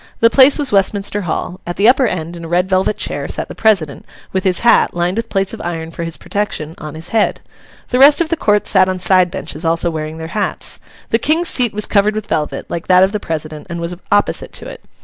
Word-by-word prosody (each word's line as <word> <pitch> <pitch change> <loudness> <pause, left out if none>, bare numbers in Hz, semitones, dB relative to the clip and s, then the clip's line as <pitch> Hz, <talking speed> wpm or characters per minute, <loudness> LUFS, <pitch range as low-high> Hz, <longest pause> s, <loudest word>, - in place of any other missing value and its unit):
The 230 0 +4
place 270 +2 +6
was 285 -4 -1
Westminster 200 +1 +1
Hall. 180 +3 -3
At 175 - -3
the 205 - +3
upper 255 +1 +4
end, 170 -3 -4
in 170 - -9
a - - -6
red 175 +2 +1
velvet 190 +2 +1
chair, - - -3
sat - - -3
the - - -7
president, 190 -10 +1 0.3
with 190 +1 -1
his 185 -2 +1
hat 235 -6 +3
(lined 175 +1 0
with 230 +1 -3
plates 195 -1 -1
of - - -7
iron 165 -1 -4
for 170 - -6
his 165 -2 -5
protection) 160 -3 -4
on 155 -1 -8
his 160 +1 -7
head. 220 -2 +1 0.5
The 250 - 0
rest 285 +2 +7
of 335 -2 0
the 335 - +1
Court 210 -9 +1
sat 190 -2 +3
on 185 0 -2
side 185 0 +3
benches, 150 -1 -6
also 165 +1 +1
wearing 155 0 -5
their 160 0 -7
hats. 210 -1 -3 0.3
The 225 - +3
King's 320 +7 +1
seat 245 -4 +1
was 210 0 0
covered 210 +1 +2
with 215 -1 -3
velvet, 155 -5 -2
like 170 - -5
that 185 0 +6
of 190 - +2
the 210 - -2
president, 155 -3 -6
and 170 0 -5
was 170 +1 -4 0.2
opposite 205 0 +1
to - - -7
it. - - -10
190 Hz, 245 wpm, -16 LUFS, 165-215 Hz, 0.5 s, rest